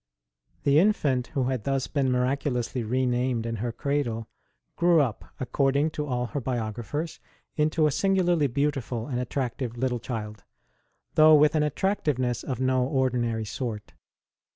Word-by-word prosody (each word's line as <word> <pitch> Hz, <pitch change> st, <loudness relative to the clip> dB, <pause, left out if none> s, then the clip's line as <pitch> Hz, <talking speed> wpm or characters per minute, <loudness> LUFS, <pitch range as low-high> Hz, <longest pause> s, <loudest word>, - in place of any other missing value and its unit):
1HE 140 Hz, +1 st, +5 dB
infant 150 Hz, -, +2 dB
who 135 Hz, -, +2 dB
had 125 Hz, -3 st, -1 dB
thus 135 Hz, -1 st, 0 dB
been 135 Hz, -3 st, 0 dB
miraculously 125 Hz, -1 st, 0 dB
re 125 Hz, +4 st, 0 dB
named 125 Hz, -1 st, 0 dB
in 115 Hz, -1 st, -3 dB
her 120 Hz, +3 st, -2 dB
cradle 120 Hz, -4 st, -2 dB, 0.5 s
grew 170 Hz, -1 st, +4 dB
up, 130 Hz, -8 st, -1 dB
according 140 Hz, +3 st, +1 dB
to 150 Hz, -1 st, -4 dB
all 125 Hz, -2 st, -1 dB
her 140 Hz, +3 st, -4 dB
biographers, 120 Hz, +6 st, -3 dB, 0.4 s
into 155 Hz, +1 st, +2 dB
a 150 Hz, -, +3 dB
singularly 175 Hz, -2 st, +2 dB
beautiful 130 Hz, -3 st, -1 dB
and 125 Hz, -3 st, -3 dB
attractive 125 Hz, -1 st, -3 dB
little 125 Hz, -1 st, 0 dB
child, 110 Hz, -3 st, -6 dB, 0.7 s
though 155 Hz, 0 st, +7 dB
with 150 Hz, 0 st, +5 dB
an 155 Hz, -, +2 dB
attractiveness 150 Hz, -, 0 dB
of 130 Hz, -4 st, -4 dB
no 130 Hz, -1 st, +2 dB
ordinary 125 Hz, -4 st, 0 dB
sort. 105 Hz, -2 st, -5 dB
130 Hz, 145 wpm, -26 LUFS, 120-145 Hz, 0.7 s, though